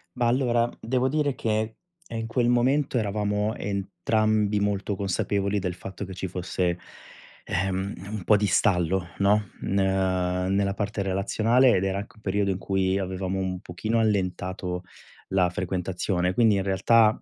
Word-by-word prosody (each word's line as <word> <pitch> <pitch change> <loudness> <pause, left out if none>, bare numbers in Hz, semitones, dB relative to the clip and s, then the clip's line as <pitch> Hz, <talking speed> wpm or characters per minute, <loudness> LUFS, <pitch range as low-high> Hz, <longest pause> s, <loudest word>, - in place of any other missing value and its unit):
Ma 120 - 0
allora, 120 -1 +2
devo 130 +2 0
dire 145 -1 0
che, 110 0 -1 0.3
ehm, 115 - -5
in 115 - -3
quel 120 +1 +1
momento 130 +3 +2
eravamo 105 0 0
entrambi 105 +1 0
molto 100 0 -1
consapevoli 100 +1 0
del 90 -2 -3
fatto 95 +2 -7
che 95 0 -8
ci 95 +1 -3
fosse, 90 0 -1 0.7
ehm, 95 +2 -1 0.2
un 105 -3 -5
po' 105 - +5
di 105 0 +2
stallo, 90 -3 +2
no, 100 0 +2
n 100 - -1
ehm, 95 -1 +1
nella 100 0 +1
parte 105 0 -2
relazionale 110 +6 +3
ed 95 - +1
era 95 0 0
anche 100 - -9
un 110 - -20
periodo 100 0 0
in 95 - 0
cui 95 0 0
avevamo 95 0 -2
un 95 -1 -2
pochino 110 +6 -2
allentato 90 -3 -1 0.5
la 95 -2 +3
frequentazione. 90 0 -1
Quindi 110 0 +4
in 95 - 0
realtà, 110 +3 +3
100 Hz, 155 wpm, -26 LUFS, 95-110 Hz, 0.7 s, po